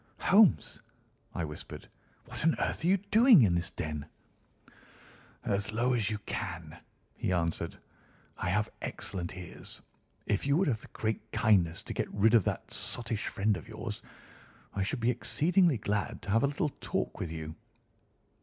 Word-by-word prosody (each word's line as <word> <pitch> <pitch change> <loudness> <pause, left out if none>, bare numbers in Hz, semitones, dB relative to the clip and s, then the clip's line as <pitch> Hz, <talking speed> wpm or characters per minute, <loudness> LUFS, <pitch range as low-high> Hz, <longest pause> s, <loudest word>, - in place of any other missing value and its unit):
"Holmes!" 205 0 +4 0.5
I 85 - -1
whispered, 75 0 -9 0.4
"what - - -6
on 165 0 +4
earth - - -1
are - - +2
you 190 +2 +5
doing 205 - +6
in 95 -5 +4
this 85 0 +1
den?" 75 -1 -5 1.4
"As 100 +2 0
low 120 +3 +2
as 110 -5 +1
you 105 - -1
can," - - -5 0.3
he - - -2
answered; 85 -2 -1 0.6
"I - - -2
have 105 +3 +1
excellent 90 -2 -4
ears. 90 -2 -8 0.5
If 105 +6 0
you 140 +1 +4
would 190 - +2
have 115 -6 0
the - - -10
great 110 0 -3
kindness 90 -7 +3
to - - -5
get - - -2
rid 110 +3 +3
of 115 -6 +5
that - - -3
sottish 115 -3 -1
friend 105 -1 +1
of 85 - -8
yours - - -6 0.7
I 100 - -2
should 115 +6 -1
be 120 +2 +3
exceedingly 165 - +2
glad 105 -1 -2
to 100 - -4
have 115 +2 +4
a 140 - +3
little 150 +3 -1
talk - - -2
with 85 - -3
you." 80 -1 -6
110 Hz, 165 wpm, -31 LUFS, 90-140 Hz, 1.4 s, doing